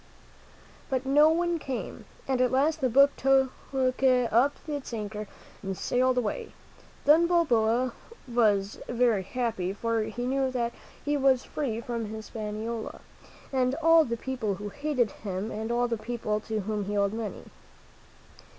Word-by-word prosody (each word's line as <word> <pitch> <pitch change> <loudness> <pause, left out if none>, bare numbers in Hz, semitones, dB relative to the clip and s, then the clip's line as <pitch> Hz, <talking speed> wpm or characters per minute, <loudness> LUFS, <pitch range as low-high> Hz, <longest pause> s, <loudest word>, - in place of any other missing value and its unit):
But 265 -1 -1
no 295 +3 +6
one 340 +1 +1
came, 265 -4 -5 0.2
and 260 -2 +1
at 250 - +3
last 295 +4 +2
the 260 - +2
boat 275 +4 +6
took 270 -1 +3 0.6
up 250 +2 +3
its 290 -5 -5
anchor 210 -1 -5 0.3
and 195 -2 -4
sailed 255 +1 +1
away. 225 -4 -2 0.5
Then 320 +4 +6
Balboa 250 -8 +2 0.3
was 210 -4 +1
very 240 -4 +2
happy, 220 -3 -2
for 230 +2 -1
he 245 +2 -4
knew 265 +1 +1
that 240 -2 -2 0.3
he 295 0 +1
was 265 -2 +3
free 235 -7 -3
from 235 -1 -3
His 220 +1 -8
paniola 220 +1 -5 0.5
and 260 0 +2
all 330 +1 +5
the 235 -4 -3
pepole 230 -5 -2
who 205 +2 -6
hated 280 -5 0
him 200 +1 -5
and 220 +2 -4
all 240 +1 +2
the 230 -1 -1
people 220 -2 -2
to 220 0 -3
whom 210 0 -2
he 205 +1 -2
owed 200 0 +2
money. 225 -2 -5
240 Hz, 150 wpm, -28 LUFS, 220-270 Hz, 0.6 s, no